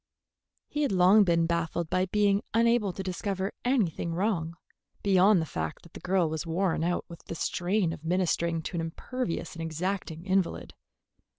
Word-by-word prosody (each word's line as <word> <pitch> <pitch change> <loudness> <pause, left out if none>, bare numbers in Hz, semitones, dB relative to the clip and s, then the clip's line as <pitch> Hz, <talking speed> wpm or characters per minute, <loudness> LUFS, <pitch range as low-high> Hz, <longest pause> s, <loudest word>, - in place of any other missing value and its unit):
He 295 - -3
had 285 - +1
long 190 +3 +6
been 170 -3 +2
baffled 170 0 -1
by 185 +1 +2
being 205 0 +2
unable 230 -3 +3
to 190 - -6
discover 190 +1 -3
anything 190 - 0
wrong, 170 -4 -1 0.5
beyond 195 0 +5
the 160 - -1
fact 80 - -4
that 170 - -17
the - - -8
girl 185 -2 +1
was 160 0 -3
worn 170 0 0
out 175 +1 0
with 170 -1 -11
the - - -6
strain 180 +1 0
of 160 - -10
ministering 170 -1 0
to 175 - -4
an - - 0
imperious 170 +5 -4
and 165 - -7
exacting 165 +1 -3
invalid. 190 -2 0
180 Hz, 170 wpm, -28 LUFS, 165-195 Hz, 0.5 s, long